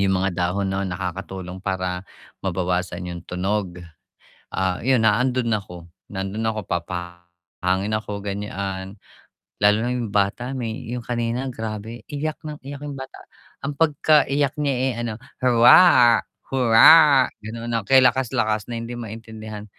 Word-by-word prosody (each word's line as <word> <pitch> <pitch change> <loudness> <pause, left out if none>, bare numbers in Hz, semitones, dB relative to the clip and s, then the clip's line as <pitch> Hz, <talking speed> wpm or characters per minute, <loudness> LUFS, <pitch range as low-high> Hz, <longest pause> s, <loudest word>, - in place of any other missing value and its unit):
Yung 95 -1 +2
mga 95 0 0
dahon 95 +2 -1
no'n 95 0 -2
nakakatulong 95 0 -5
para 95 -2 -2 0.4
mabawasan 90 -1 -2
yung 85 - -7
tunog. 95 0 -2 0.8
Ah, 95 -1 0
yun 130 -3 +3
nandon 125 +3 +2
ako, 90 -5 -4 0.2
nandon 95 +3 -3
ako 110 -1 -1
papahangin 85 +2 -4
ako 105 -2 -6
ganyan, 100 -1 -5 0.6
lalo 105 +1 +4
na 120 - -1
yung 120 -4 -3
bata 105 +6 0
may 120 -1 -4
yung 125 - -3
kanina 120 +2 -2
grabe 110 0 -6
iyak 150 +1 -4
nang 150 -1 -7
iyak 140 +2 -7
yung 145 - -5
bata. 135 -1 -10 0.4
Ang 145 - -2
pagka-iyak 145 -2 +2
niya, 140 -2 +1
eh, 130 +1 0
ano, 115 -2 -4 0.2
"huwaa 120 +1 +7 0.3
hurraa," 135 +3 +7 0.2
ganon, 115 +2 -7
na 115 - +1
kay 130 +7 +4
lakas-lakas, 110 -4 +1
na 120 - -3
hindi 115 +1 -6
maintindihan 110 -2 -8
110 Hz, 135 wpm, -22 LUFS, 95-125 Hz, 0.8 s, huwaa